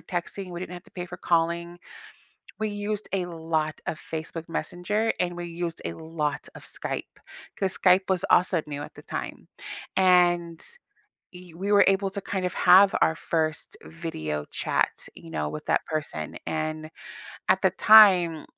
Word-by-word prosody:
texting, 180 +1 -5
we 175 - -6
didn't 180 -1 -6
have 175 +1 -10
to - - -21
pay 180 -1 -6
for 180 - -8
calling. 170 +1 0 0.8
We 215 - -1
used 205 0 -4
a 190 -2 0
lot 160 -2 -2
of 155 - -3
Facebook 165 +1 -6
Messenger, 205 +7 -1
and 175 -1 -1
we 175 0 -5
used 170 -1 -5
a - - -4
lot 160 -2 -3
of - - -12
Skype, - - -4 0.6
'cause 190 -1 +1
Skype 185 +1 +4
was 190 -2 0
also 175 -1 +4
new 145 0 -5
at - - -10
the - - -12
time. - - -6 0.5
And 175 -2 +3 0.7
e 180 -2 -13
we 195 +4 -3
were 200 0 +6
able 195 0 +2
to 200 0 -4
kind 190 -2 -3
of 180 - -2
have 190 +2 +6
our 160 - +4
1st 160 -2 -2
video 80 - -5
chat, - - -1
you - - -12
know, 75 -1 -2
with 150 - -7
that - - +1
person, 150 - -4
and 155 0 -3 0.6
at - - +3
the - - +4
time, 185 -7 +6
175 Hz, 170 wpm, -26 LUFS, 160-185 Hz, 0.8 s, were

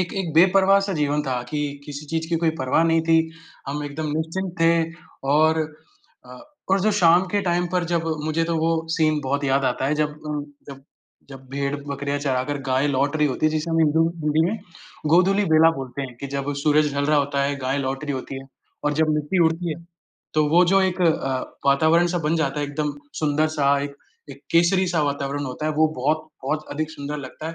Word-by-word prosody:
एक 180 - -2
एक 165 -4 -4
बेपरवाह 190 +3 +5
सा 195 - -2
जीवन 150 -2 0
था 130 -3 -2
कि 150 - -2 0.2
किसी 145 0 -8
चीज़ 160 +1 -3
की 170 - +1
कोई 165 0 +1
परवाह 130 +5 +2
नहीं 165 0 +2
थी, 165 0 +2 0.4
हम 145 +1 -3
एकदम 150 +2 -4
निश्चिंत 170 +3 -3
थे 165 0 +4 0.5
और 160 +1 +4 0.7
अ, - - -11 0.3
और 195 0 +3
जो 215 +2 +2
शाम 175 0 +5
के 205 - +2
टाइम 175 0 0
पर 180 -2 +1
जब 170 -1 -1 0.2
मुझे 160 +1 0
तो 165 0 -1
वो 160 +1 +1 0.2
सीन 155 -2 +2
बहुत 140 +2 -1
याद 135 0 +2
आता 130 +1 0
है, 150 - +1
जब 150 0 -2
उम, 150 -1 -3 0.2
जब 135 -1 -10 0.5
जब 135 -1 -12
भेड़, 140 +1 -2
बकरियाँ 140 0 -3
चराकर 140 0 -1
गाय 130 +2 +2
लौट 140 +3 0
रही 150 -1 +3
होती 140 +3 0
है, - - +3
जिसे 155 +2 -2
हम 165 - +1
हिंदू 160 0 +3
हिंदी 155 0 +1
में 215 +4 -2 0.5
गोधूलि 190 +5 +4
बेला 160 +1 +6
बोलते 135 +1 -5
हैं, 125 -3 -8
कि 140 - -4
जब 140 +1 -3
सूरज 150 -1 +3
ढल 140 0 0
रहा 150 -1 +3
होता 140 0 0
है, 140 +1 0
गाय 130 +1 -1
लौट 135 +1 -3
रही 145 - -2
होती 130 +1 -6
है 135 - -13 0.4
और 150 - +2
जब 160 +1 +2
मिट्टी 150 +4 0
उड़ती 165 +2 0
है। 170 +2 -11 0.5
तो 155 -1 +3
वो 175 +3 +5
जो 195 - +5
एक 185 -1 -1
अ, 135 -6 +1 0.3
वातावरण 160 +5 +4
सा - - +1
बन 160 +2 +1
जाता 150 -2 -1
है 145 - -1
एकदम 145 0 -2 0.3
सुंदर 155 +1 +2
सा, 140 -1 +3
एक 140 0 -6 0.3
एक - - -11
केसरी 175 +3 +4
सा 165 -3 +1
वातावरण 140 0 -2
होता 130 +4 -4
है, 155 - 0
वो 155 +1 +3
बहुत-बहुत 155 +1 -2
अधिक 155 +1 -3
सुंदर 145 -1 -6
लगता 145 +4 -7
है 165 - -6
150 Hz, 215 wpm, -23 LUFS, 140-165 Hz, 0.7 s, बेला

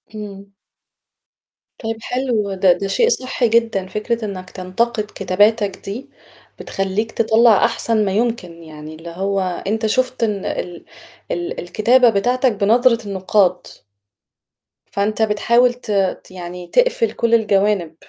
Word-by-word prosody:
إمم. 200 -2 -8 1.4
طيب 225 0 -3
حلو، 235 -6 -1
ده 190 -1 +4
ده 195 - -4
شيء 460 - +2
صحّي 255 - 0
جدًا، 225 -5 +1
فكرة 220 +3 -3
إنك 185 -3 -7
تنتقد 215 +5 -2
كتاباتك 205 +2 +2
دي، 215 +7 -6 0.5
بتخلّيك 195 +3 -2
تطلَّع 225 -1 +4
أحسن 230 -2 0
ما 195 - -1
يمكن، 190 -6 -2
يعني 155 0 -10
اللي 165 +2 -10
هو 195 +3 -2 0.3
أنت 220 +2 -1
شُفت 255 +1 0
إن 205 -3 -1
ال 175 -1 -5 0.5
ال 175 0 -3
الكتابة 235 +7 +3
بتاعتك 245 +5 +1
بنظرة 230 +3 +2
النُقّاد. 190 -1 +1 1.2
فأنت 210 +2 -1
بتحاول 235 +3 +3
ت 245 -3 -8 0.3
ت - - -17
يعني 180 -1 -8
تقفل - - +2
كلّ 230 +1 -1
الجوانب، 200 -6 +1
210 Hz, 125 wpm, -19 LUFS, 190-235 Hz, 1.4 s, ده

